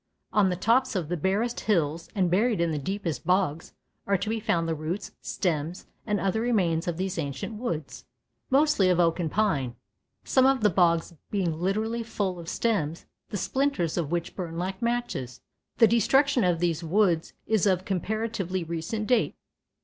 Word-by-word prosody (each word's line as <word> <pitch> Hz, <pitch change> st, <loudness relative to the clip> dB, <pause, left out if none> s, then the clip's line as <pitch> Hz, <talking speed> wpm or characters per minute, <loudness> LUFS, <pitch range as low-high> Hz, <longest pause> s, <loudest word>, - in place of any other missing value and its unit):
On 205 Hz, -3 st, +4 dB
the 180 Hz, -, 0 dB
tops 235 Hz, +6 st, +2 dB
of 170 Hz, -5 st, -2 dB
the 175 Hz, -, 0 dB
barest 200 Hz, +8 st, 0 dB
hills 165 Hz, -5 st, 0 dB
and 185 Hz, -4 st, +2 dB
buried 215 Hz, +3 st, +2 dB
in 170 Hz, -1 st, +1 dB
the 150 Hz, -, -1 dB
deepest 175 Hz, -2 st, -3 dB
bogs 180 Hz, -3 st, 0 dB, 0.3 s
are 200 Hz, 0 st, +3 dB
to 200 Hz, +3 st, -3 dB
be 225 Hz, 0 st, -1 dB
found 170 Hz, -5 st, 0 dB
the 165 Hz, -, 0 dB
roots, 160 Hz, +5 st, -4 dB
stems 170 Hz, -1 st, -2 dB, 0.2 s
and 210 Hz, -2 st, +1 dB
other 195 Hz, +3 st, 0 dB
remains 185 Hz, -8 st, +1 dB
of 170 Hz, -2 st, -1 dB
these 185 Hz, -1 st, -2 dB
ancient 140 Hz, -, -4 dB
woods, 170 Hz, -11 st, -4 dB, 0.4 s
mostly 275 Hz, -8 st, +4 dB
of 180 Hz, -1 st, +3 dB
oak 170 Hz, 0 st, +3 dB
and 165 Hz, -3 st, 0 dB
pine, 145 Hz, -, 0 dB, 0.5 s
some 260 Hz, 0 st, +4 dB
of 270 Hz, -2 st, +3 dB
the 210 Hz, -2 st, +4 dB
bogs 170 Hz, -1 st, +2 dB, 0.2 s
being 185 Hz, -5 st, 0 dB
literally 215 Hz, +6 st, 0 dB
full 205 Hz, -5 st, -2 dB
of 165 Hz, -1 st, -7 dB
stems, 170 Hz, -9 st, -1 dB, 0.2 s
the 205 Hz, -, -3 dB
splinters 265 Hz, -, 0 dB
of 165 Hz, -4 st, -2 dB
which 175 Hz, -1 st, -2 dB
burn 170 Hz, -3 st, -5 dB
like 190 Hz, +2 st, -3 dB
matches. 235 Hz, -, -2 dB, 0.4 s
The 230 Hz, -, +7 dB
destruction 260 Hz, +4 st, +3 dB
of 175 Hz, -2 st, +2 dB
these 170 Hz, -1 st, 0 dB
woods 175 Hz, -1 st, +2 dB
is 215 Hz, -2 st, +2 dB
of 185 Hz, -1 st, +1 dB
comparatively 195 Hz, -1 st, -2 dB
recent 170 Hz, +6 st, -3 dB
date. 240 Hz, 0 st, +2 dB
185 Hz, 175 wpm, -27 LUFS, 165-220 Hz, 0.5 s, The